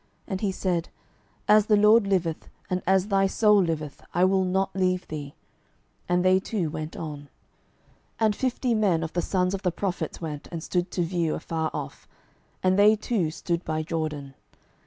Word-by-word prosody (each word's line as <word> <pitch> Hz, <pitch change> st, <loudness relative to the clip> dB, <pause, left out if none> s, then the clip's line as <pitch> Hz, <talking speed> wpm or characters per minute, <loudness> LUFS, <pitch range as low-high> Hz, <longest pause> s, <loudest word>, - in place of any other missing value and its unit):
And 190 Hz, -3 st, -4 dB
he 205 Hz, -3 st, +1 dB
said, 180 Hz, -3 st, -1 dB, 0.6 s
As 210 Hz, 0 st, +5 dB
the 210 Hz, -, +5 dB
LORD 210 Hz, +1 st, +5 dB
liveth, 175 Hz, -5 st, -1 dB, 0.2 s
and 180 Hz, 0 st, 0 dB
as 190 Hz, +1 st, +3 dB
thy 195 Hz, -1 st, +3 dB
soul 210 Hz, +1 st, +4 dB
liveth, 155 Hz, -4 st, -3 dB
I 175 Hz, +1 st, +4 dB
will 190 Hz, 0 st, +3 dB
not 190 Hz, +1 st, 0 dB
leave 185 Hz, -1 st, 0 dB
thee. 145 Hz, -2 st, -7 dB, 0.7 s
And 180 Hz, +1 st, +2 dB
they 185 Hz, 0 st, +5 dB
two 190 Hz, -5 st, -2 dB
went 155 Hz, 0 st, -5 dB
on. 150 Hz, -3 st, -5 dB
12:002:007 145 Hz, -, -15 dB, 0.9 s
And 215 Hz, -2 st, +3 dB
fifty 255 Hz, 0 st, 0 dB
men 195 Hz, -7 st, +2 dB
of 160 Hz, -, -5 dB
the 175 Hz, -, 0 dB
sons 180 Hz, +1 st, 0 dB
of 195 Hz, -, -3 dB
the 180 Hz, -, +1 dB
prophets 185 Hz, +1 st, -3 dB
went, 150 Hz, -3 st, -6 dB
and 165 Hz, -2 st, -5 dB
stood 180 Hz, 0 st, -1 dB
to 180 Hz, -, -1 dB
view 170 Hz, -2 st, -1 dB
afar 160 Hz, 0 st, -2 dB
off: -, -, -7 dB, 0.6 s
and 185 Hz, +1 st, +3 dB
they 210 Hz, +2 st, +7 dB
two 210 Hz, -6 st, -1 dB
stood 170 Hz, +2 st, -3 dB
by 155 Hz, 0 st, -2 dB
Jordan. 155 Hz, -4 st, -4 dB
180 Hz, 180 wpm, -26 LUFS, 165-195 Hz, 0.9 s, they